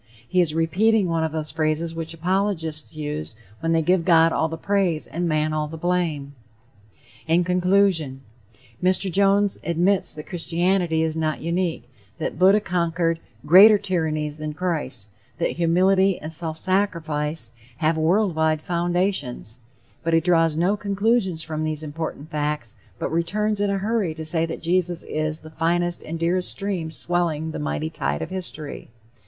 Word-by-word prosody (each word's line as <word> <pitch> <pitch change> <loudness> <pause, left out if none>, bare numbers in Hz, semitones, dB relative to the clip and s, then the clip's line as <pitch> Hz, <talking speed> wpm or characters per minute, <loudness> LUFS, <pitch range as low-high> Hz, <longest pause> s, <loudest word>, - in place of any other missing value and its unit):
He 185 0 +3
is 160 -3 0
repeating 195 +6 +2
one 165 -1 0
of 160 - -1
those 155 -1 -3
phrases 160 +1 -1
which 165 -1 -4
apologists 165 -3 -2
use 150 -4 -4 0.2
when 165 - -1
they 165 -1 +2
give 180 +1 +2
God 165 -1 +5
all 160 - +1
the 165 - -5
praise 190 -4 0
and 175 +1 -3
man 155 0 +1
all 155 -1 -1
the 160 +2 -8
blame. 160 -5 -1 0.9
In 170 +2 +3
conclusion: 180 -6 +2 0.6
Mr. 185 +1 +3
Jones 200 +2 +3
admits 175 +4 +2
that 150 - -8
Christianity 175 -1 0
is 160 -1 -1
not 155 -2 -1
unique, 170 -5 -2 0.3
that - - -4
Buddha 195 +3 +6
conquered 170 -3 0 0.3
greater 200 +7 +8
tyrannies 155 -6 -2
than 155 -1 -5
Christ; 150 - -3 0.3
that 170 - 0
"humility 185 +3 +3
and 155 +1 -6
self 160 -1 -2
sacrifice...have 155 - -1
world 180 +5 +2
wide 160 -1 +1
foundations;" 175 - -1 0.4
but 165 0 +1
he - - +6
draws 165 -2 +2
no 180 +5 +2
conclusions 200 -4 0
from 155 -1 -4
these 155 0 -2
important 155 0 -6
facts, 150 -7 -3 0.2
but - - -3
returns 205 +6 0
in 205 - +1
a 200 - 0
hurry 200 -4 -1
to 160 0 -6
say 165 +1 +2
that 165 - -6
Jesus 175 0 0
is 155 0 -3
the 155 - -12
"finest 175 +2 0
and 165 +1 -5
dearest 175 +2 +1
stream 190 -5 -2
swelling 160 -1 -1
the - - -5
mighty 75 +1 -3
tide 70 +1 -2
of - - -7
history." 170 -5 -5
165 Hz, 160 wpm, -23 LUFS, 155-185 Hz, 0.9 s, greater